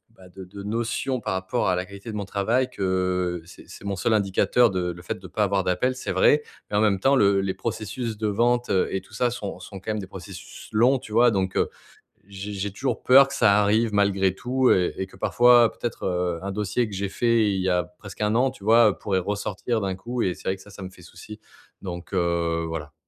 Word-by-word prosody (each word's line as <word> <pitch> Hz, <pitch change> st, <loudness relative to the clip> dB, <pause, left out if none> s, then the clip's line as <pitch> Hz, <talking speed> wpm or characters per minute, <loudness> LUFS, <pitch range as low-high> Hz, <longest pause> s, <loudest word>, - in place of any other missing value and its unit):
bah, 95 Hz, -4 st, -16 dB
de 95 Hz, +1 st, -10 dB
de 100 Hz, +2 st, -10 dB
notions 115 Hz, +4 st, -2 dB
par 105 Hz, -, -2 dB
rapport 95 Hz, +4 st, -1 dB
à 90 Hz, -, +2 dB
la 90 Hz, +1 st, -2 dB
qualité 100 Hz, +3 st, -9 dB
de -, -, -7 dB
mon 100 Hz, -, -3 dB
travail, 115 Hz, +7 st, 0 dB
que 90 Hz, -5 st, -1 dB
c'est 85 Hz, -, -15 dB
c'est -, -, -12 dB
mon 100 Hz, -1 st, -2 dB
seul 110 Hz, -, +1 dB
indicateur 105 Hz, +4 st, +3 dB
de 90 Hz, -2 st, -2 dB
le 85 Hz, 0 st, -10 dB
fait 90 Hz, -, -4 dB
de 95 Hz, -, -11 dB
pas 105 Hz, +5 st, -1 dB
avoir 100 Hz, -1 st, +1 dB
d'appels, 125 Hz, +9 st, 0 dB
c'est 130 Hz, -, -4 dB
vrai. 150 Hz, 0 st, +4 dB, 0.3 s
En 105 Hz, -, +2 dB
même 105 Hz, -3 st, +2 dB
temps, 135 Hz, +7 st, +3 dB
le 100 Hz, -5 st, +4 dB
les 95 Hz, -1 st, -2 dB
processus 115 Hz, +1 st, -4 dB
de 110 Hz, 0 st, -1 dB
vente 120 Hz, +4 st, +1 dB
et 95 Hz, 0 st, +1 dB
tout -, -, -21 dB
ça, 125 Hz, -, +1 dB
sont 100 Hz, -6 st, -6 dB
sont 95 Hz, +1 st, -10 dB
quand 95 Hz, -, -4 dB
même 105 Hz, -, -2 dB
des 95 Hz, -, -7 dB
processus -, -, -10 dB
longs, 125 Hz, +5 st, +4 dB
tu 110 Hz, -, -11 dB
vois? 120 Hz, +2 st, +5 dB
Donc, 95 Hz, -2 st, -1 dB
heu, -, -, +1 dB, 0.6 s
j'ai 100 Hz, +1 st, -7 dB
j'ai 100 Hz, +1 st, -3 dB
toujours 130 Hz, +7 st, -3 dB
peur 135 Hz, +2 st, +7 dB
que -, -, -8 dB
ça 105 Hz, -3 st, +4 dB
arrive 110 Hz, +2 st, +2 dB
malgré 100 Hz, -2 st, +2 dB
tout 125 Hz, +5 st, +1 dB
et 90 Hz, -1 st, +2 dB
et 95 Hz, -, -2 dB
que 95 Hz, -, -17 dB
parfois 120 Hz, -1 st, +5 dB
peut-être, 120 Hz, -, -5 dB
heu, 90 Hz, -2 st, -1 dB
un 100 Hz, -, -3 dB
dossier 105 Hz, +4 st, -1 dB
que 105 Hz, -, -10 dB
j'ai 100 Hz, +1 st, -2 dB
fait 115 Hz, +1 st, +2 dB
il 95 Hz, -, -1 dB
y 95 Hz, -, -1 dB
a 90 Hz, -1 st, +2 dB
presque 100 Hz, 0 st, -11 dB
1 105 Hz, 0 st, +1 dB
an, 130 Hz, +2 st, +3 dB
tu 125 Hz, -, -16 dB
vois, 110 Hz, -1 st, +5 dB
pourrait 95 Hz, -2 st, -1 dB
ressortir 105 Hz, +4 st, -2 dB
d'un 95 Hz, -1 st, -2 dB
coup 120 Hz, +6 st, -4 dB
et 90 Hz, -, +1 dB
c'est -, -, -12 dB
vrai 95 Hz, -, +1 dB
que 95 Hz, -, -16 dB
ça, 105 Hz, -, -15 dB
ça 100 Hz, 0 st, -12 dB
me 95 Hz, -, -6 dB
fait 90 Hz, -, -17 dB
souci. 105 Hz, +4 st, -12 dB, 0.4 s
Donc, 90 Hz, -1 st, -7 dB
heu, 85 Hz, -2 st, 0 dB
voilà. 80 Hz, -1 st, -6 dB
100 Hz, 240 wpm, -24 LUFS, 95-115 Hz, 0.6 s, peur